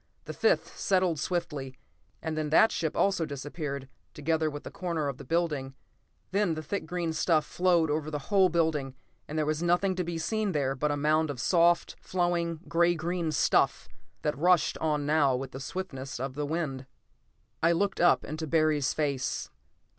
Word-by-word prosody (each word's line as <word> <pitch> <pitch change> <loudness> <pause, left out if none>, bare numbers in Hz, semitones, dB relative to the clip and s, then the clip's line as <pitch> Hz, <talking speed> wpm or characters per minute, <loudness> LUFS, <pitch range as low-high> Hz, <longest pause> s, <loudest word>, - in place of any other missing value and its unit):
The - - -6
fifth 465 +2 +1
settled 185 -5 +2
swiftly 145 -6 -3 0.5
and 160 -1 -2
then 155 -1 -2
that 220 +8 +5
ship 160 -1 -2
also 195 -4 +2
disappeared, 140 -1 -5 0.3
together 160 +1 0
with 145 0 -8
a - - -7
corner 170 -5 -2
of 140 -2 -4
the - - -8
building. 150 -6 -1 0.6
Then 195 -4 +1
the 155 - -5
thick 195 +3 -4
green 170 -1 -2
stuff 160 -2 +2
flowed 175 -2 +2
over 155 0 -1
the 150 - -2 0.2
whole 190 -2 +6
building 160 -5 0 0.3
and 155 - -5
there 155 - +1
was 155 +1 -1
nothing 175 +3 +2
to 180 - 0
be 170 -1 -4
seen 210 +4 -1
there 135 -2 0
but 145 +3 -1
a 145 - 0
mound 155 +2 +2
of 140 -4 -5
soft, 170 +4 +3
flowing, 170 -3 -1
gray 170 +1 +3
green 170 0 -2
stuff 150 - +2 0.4
that 150 - 0
rushed 175 +1 +3
on 150 -2 0
now 145 -3 +3
with 130 +1 -4
the 135 - -7
swiftness 140 -5 -5
of 135 +1 -3
the 145 +1 -3
wind. 145 -5 -3 0.7
I 165 +1 +4
looked 195 +3 0
up, 175 - +5
into 155 +1 -5
Barry's 155 -3 +2
face. 140 -4 -2
155 Hz, 180 wpm, -29 LUFS, 145-175 Hz, 0.7 s, whole